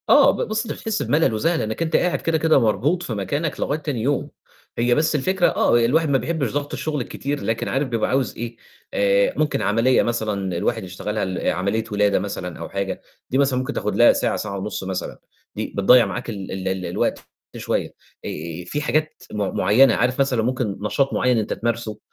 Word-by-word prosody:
آه، -, -, +7 dB
ب -, -, -2 dB
بُص، 215 Hz, +2 st, -1 dB
أنت 220 Hz, -, -3 dB
بتحس 220 Hz, -1 st, -3 dB
بملل 150 Hz, -5 st, +2 dB
وزهق 165 Hz, +11 st, +1 dB
لإنّك 110 Hz, -3 st, -2 dB
أنت 160 Hz, -1 st, 0 dB
قاعد 180 Hz, -, +1 dB
كده، 165 Hz, -1 st, +1 dB
كده 160 Hz, -2 st, +4 dB
مربوط 140 Hz, +10 st, +1 dB
في 115 Hz, -, -4 dB
مكانك 140 Hz, -, -2 dB
لغاية 145 Hz, +2 st, -1 dB
تاني 145 Hz, -7 st, -3 dB
يوم، 140 Hz, +5 st, 0 dB, 0.5 s
هي 120 Hz, +1 st, +3 dB
بس 155 Hz, 0 st, +1 dB
الفكرة 180 Hz, +6 st, +2 dB
آه، -, -, +3 dB
الواحد 155 Hz, +6 st, +2 dB
ما 140 Hz, -, +4 dB
بيحبّش 135 Hz, -1 st, -2 dB
ضَغْط 145 Hz, 0 st, -3 dB
الشغل 150 Hz, -3 st, -2 dB
الكتير 140 Hz, +4 st, -4 dB
لكن 115 Hz, 0 st, -1 dB
عارف 135 Hz, +1 st, 0 dB
بيبقى 115 Hz, -3 st, -1 dB
عاوز 130 Hz, -1 st, 0 dB
إيه، 115 Hz, 0 st, -5 dB, 0.4 s
آآ 100 Hz, 0 st, +3 dB
ممكن 150 Hz, -2 st, +1 dB
عملية 115 Hz, +5 st, +3 dB
مثلًا 105 Hz, -6 st, -2 dB
الواحد -, -, -1 dB
يشتغلها 100 Hz, +3 st, -3 dB
ل 95 Hz, -1 st, -3 dB
عملية 100 Hz, +5 st, 0 dB
ولادة 105 Hz, -1 st, +2 dB
مثلًا 90 Hz, -3 st, -5 dB
أو -, -, -6 dB
حاجة، 100 Hz, -1 st, -3 dB, 0.3 s
دي 130 Hz, -, +1 dB
مثلًا 135 Hz, -2 st, +2 dB
ممكن 130 Hz, -, -3 dB
تاخد -, -, -2 dB
لها -, -, +7 dB
ساعة، -, -, 0 dB
ساعة 100 Hz, -2 st, -4 dB
ونُص 100 Hz, 0 st, -4 dB
مثلًا، 95 Hz, -1 st, -4 dB, 0.4 s
دي -, -, -4 dB
بتضيّع 120 Hz, +5 st, +6 dB
معاك -, -, -5 dB
ال 100 Hz, -4 st, -6 dB
ال 95 Hz, 0 st, -4 dB
ال 95 Hz, -1 st, -2 dB
الوقت -, -, -2 dB, 0.3 s
شوية. -, -, -2 dB, 0.3 s
آآ -, -, -3 dB, 0.4 s
فيه 145 Hz, +11 st, -3 dB
حاجات 155 Hz, +1 st, -1 dB
م 105 Hz, -2 st, -2 dB
مُعيّنة، 115 Hz, +6 st, +5 dB
عارف 125 Hz, +3 st, 0 dB
مثلًا 130 Hz, -5 st, +2 dB
ممكن 120 Hz, -4 st, -1 dB
نشاط 135 Hz, +6 st, 0 dB
مُعيّن 125 Hz, -1 st, +2 dB
أنت 110 Hz, -1 st, -1 dB
تمارسه 115 Hz, -2 st, -3 dB
120 Hz, 200 wpm, -22 LUFS, 105-145 Hz, 0.5 s, آه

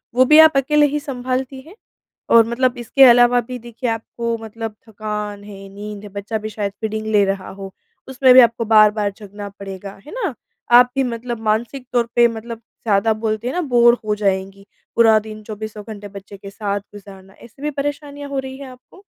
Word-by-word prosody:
वो 255 Hz, +1 st, +5 dB
भी 305 Hz, +4 st, +6 dB
आप 315 Hz, -3 st, +7 dB
अकेले 295 Hz, +2 st, +3 dB
ही 295 Hz, -, 0 dB
संभालती 260 Hz, -1 st, -4 dB
हैं? 325 Hz, +8 st, -16 dB, 0.5 s
और 230 Hz, -1 st, +6 dB
मतलब 245 Hz, +2 st, 0 dB
इसके 245 Hz, +3 st, +3 dB
अलावा 245 Hz, -1 st, +6 dB
भी 250 Hz, +2 st, -7 dB
देखिए 240 Hz, +1 st, -5 dB
आपको 230 Hz, +1 st, -3 dB
मतलब 225 Hz, 0 st, -7 dB
थकान 210 Hz, -1 st, -5 dB
है, 195 Hz, -1 st, -11 dB
नींद 205 Hz, +1 st, -9 dB
है, 205 Hz, -, -9 dB
बच्चा 200 Hz, +3 st, -4 dB
भी 215 Hz, 0 st, -6 dB
शायद 205 Hz, -2 st, -3 dB
फ़ीडिंग 220 Hz, 0 st, -3 dB
ले 205 Hz, -1 st, +5 dB
रहा 195 Hz, -1 st, -3 dB
हो। 195 Hz, -1 st, -7 dB, 0.4 s
उसमें 260 Hz, -1 st, +4 dB
भी 255 Hz, -, +9 dB
आपको 230 Hz, -1 st, +2 dB
बार-बार 210 Hz, -1 st, +4 dB
जगना 205 Hz, -1 st, -9 dB
पड़ेगा, 195 Hz, 0 st, -8 dB
है -, -, -11 dB
ना? 415 Hz, -, -3 dB, 0.4 s
आप 245 Hz, +1 st, +7 dB
भी 270 Hz, -, +2 dB
मतलब 240 Hz, -1 st, -4 dB
मानसिक 240 Hz, +4 st, -3 dB
तौर 235 Hz, -1 st, +2 dB
पे 240 Hz, 0 st, +6 dB
मतलब 230 Hz, 0 st, -7 dB
ज़्यादा -, -, -41 dB, 0.4 s
ज़्यादा 225 Hz, +1 st, +2 dB
बोलते 220 Hz, +1 st, -2 dB
है 255 Hz, -, -2 dB
ना, 360 Hz, -, -1 dB
बोरे 240 Hz, -4 st, +4 dB
हो 210 Hz, -, +1 dB
जाएँगी। 195 Hz, -1 st, -2 dB, 0.3 s
पूरा 225 Hz, -2 st, +5 dB
दिन 215 Hz, 0 st, -10 dB
चौबीसों 215 Hz, 0 st, -7 dB
घंटे 210 Hz, -2 st, -8 dB
बच्चे 200 Hz, 0 st, -11 dB
के 195 Hz, +1 st, -10 dB
साथ 200 Hz, 0 st, -3 dB
गुज़ारना, 195 Hz, -1 st, -13 dB
ऐसी 235 Hz, +6 st, -17 dB
भी 300 Hz, -, -1 dB
परेशानियाँ 285 Hz, 0 st, -5 dB
हो 275 Hz, -, -2 dB
रही 265 Hz, 0 st, -7 dB
है 280 Hz, -, -9 dB
आपको? 255 Hz, +9 st, -17 dB
225 Hz, 200 wpm, -19 LUFS, 210-255 Hz, 0.5 s, भी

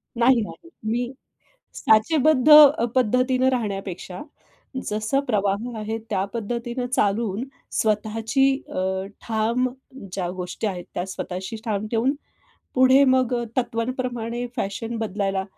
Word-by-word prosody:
नाही, 240 Hz, +1 st, +4 dB
नाही. 335 Hz, +10 st, -8 dB
मी 240 Hz, +3 st, -1 dB, 0.6 s
साचेबद्ध 280 Hz, +5 st, +3 dB
अ, 295 Hz, -5 st, +9 dB
पद्धतीनं 255 Hz, +1 st, +2 dB
राहण्यापेक्षा 195 Hz, -5 st, -4 dB, 0.7 s
जसं 215 Hz, +5 st, 0 dB
प्रवाह 210 Hz, +2 st, -1 dB
आहे 215 Hz, +1 st, -3 dB
त्या 195 Hz, -4 st, 0 dB
पद्धतीनं 235 Hz, +2 st, -3 dB
चालून 215 Hz, -2 st, 0 dB, 0.3 s
स्वतःची 220 Hz, +4 st, +1 dB, 0.2 s
अ, -, -, -3 dB, 0.4 s
ठाम 230 Hz, +3 st, 0 dB, 0.5 s
ज्या 180 Hz, -3 st, -2 dB
गोष्टी 180 Hz, +4 st, -3 dB
आहेत 180 Hz, -3 st, -4 dB
त्या 175 Hz, -, -2 dB
स्वतःशी 190 Hz, +3 st, -5 dB
ठाम 215 Hz, -1 st, -2 dB
ठेवून 240 Hz, +4 st, +2 dB, 0.6 s
पुढे 260 Hz, +2 st, +6 dB
मग 255 Hz, -2 st, +3 dB, 0.2 s
तत्त्वांप्रमाणे 240 Hz, -1 st, -2 dB
फॅशन 225 Hz, +1 st, -3 dB
बदलायला 195 Hz, -3 st, -1 dB
230 Hz, 110 wpm, -23 LUFS, 210-255 Hz, 0.7 s, अ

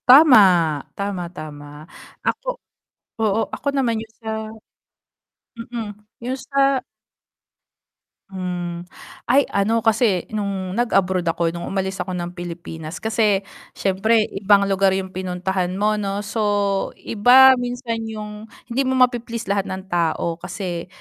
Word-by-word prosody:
Tama, 270 Hz, +1 st, +9 dB, 0.6 s
tama, 200 Hz, -2 st, -2 dB
tama. 150 Hz, -2 st, -8 dB, 0.6 s
Ako -, -, -1 dB, 0.7 s
oo 215 Hz, -1 st, +2 dB, 0.2 s
ako 285 Hz, -, -8 dB
naman 235 Hz, -5 st, +1 dB
yung 225 Hz, 0 st, -12 dB
sa 225 Hz, -, -12 dB, 1.5 s
mm, 230 Hz, -2 st, -3 dB, 0.4 s
yung 260 Hz, +2 st, -2 dB
sa 275 Hz, -1 st, +3 dB, 1.5 s
Hmm. 175 Hz, -2 st, -4 dB, 0.4 s
Ay, 270 Hz, +3 st, +4 dB
ano 220 Hz, +3 st, +1 dB
kasi 220 Hz, -5 st, +2 dB
nung 195 Hz, -3 st, -3 dB
nag-abroad 190 Hz, -6 st, +1 dB
ako, 165 Hz, 0 st, +1 dB
nung 170 Hz, 0 st, -6 dB
umalis 190 Hz, 0 st, -2 dB
ako 185 Hz, +1 st, -3 dB
ng 175 Hz, 0 st, -4 dB
Pilipinas 170 Hz, -2 st, -7 dB
kasi 215 Hz, -3 st, +2 dB, 0.3 s
syempre 215 Hz, +4 st, +2 dB
ibang 200 Hz, 0 st, +4 dB
lugar 195 Hz, 0 st, +3 dB
yung 190 Hz, -1 st, -3 dB
pinuntahan 185 Hz, 0 st, -2 dB
mo 210 Hz, +2 st, +1 dB
'no, 200 Hz, 0 st, -2 dB
so 215 Hz, +2 st, -3 dB, 0.6 s
iba 255 Hz, +4 st, +6 dB
minsan 245 Hz, -1 st, -3 dB
yung 210 Hz, -1 st, -7 dB, 0.3 s
hindi 265 Hz, +4 st, +1 dB
mo 260 Hz, -, +1 dB
mapi-please 240 Hz, -3 st, +1 dB
lahat 200 Hz, -1 st, 0 dB
ng 190 Hz, 0 st, -5 dB
tao 170 Hz, -1 st, 0 dB
kasi 175 Hz, -4 st, -5 dB
200 Hz, 125 wpm, -21 LUFS, 180-230 Hz, 1.5 s, Tama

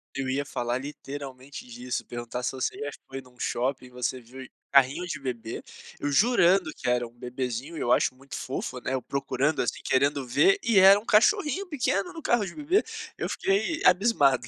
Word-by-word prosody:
Eu 135 Hz, -1 st, -2 dB
ia 140 Hz, +2 st, 0 dB
falar 120 Hz, -1 st, -2 dB
literalmente 140 Hz, -2 st, -8 dB
disso, 125 Hz, +1 st, -5 dB
perguntar 120 Hz, +1 st, -5 dB
se -, -, -1 dB
você 130 Hz, -, -3 dB
já 145 Hz, -, -3 dB, 0.2 s
foi 135 Hz, 0 st, -6 dB
num 125 Hz, -1 st, -21 dB
shopping 130 Hz, +1 st, -1 dB
e -, -, -15 dB
você 125 Hz, +1 st, -2 dB
viu 130 Hz, +2 st, -11 dB, 0.2 s
carrinho 140 Hz, +6 st, +4 dB
de 155 Hz, -4 st, -4 dB
bebê 120 Hz, -4 st, -5 dB, 0.4 s
eu 145 Hz, -, -1 dB
jurando 190 Hz, -, +4 dB
que -, -, -6 dB
era 120 Hz, -1 st, +1 dB
um -, -, -18 dB
bebezinho 125 Hz, +4 st, -5 dB
e -, -, -5 dB
eu 120 Hz, -, 0 dB
acho -, -, +3 dB
muito 135 Hz, +2 st, -10 dB
fofo, 130 Hz, -1 st, -4 dB
né, 130 Hz, -, -3 dB
eu 130 Hz, -, -1 dB
procurando, 140 Hz, +3 st, -1 dB
assim, 120 Hz, -, -2 dB
querendo 140 Hz, 0 st, +1 dB
ver, 390 Hz, -, +4 dB
e 225 Hz, -4 st, +2 dB
era 195 Hz, +2 st, +8 dB
um 215 Hz, -, -15 dB
cachorrinho 330 Hz, -, +3 dB
pequeno 220 Hz, -, -1 dB
no 325 Hz, -, -8 dB
carro 240 Hz, -6 st, +2 dB
de 170 Hz, -, -7 dB
bebê, 345 Hz, +8 st, +2 dB, 0.3 s
eu -, -, -2 dB
fiquei 380 Hz, -4 st, 0 dB
abismado. 180 Hz, -, +4 dB
135 Hz, 195 wpm, -27 LUFS, 125-195 Hz, 0.4 s, era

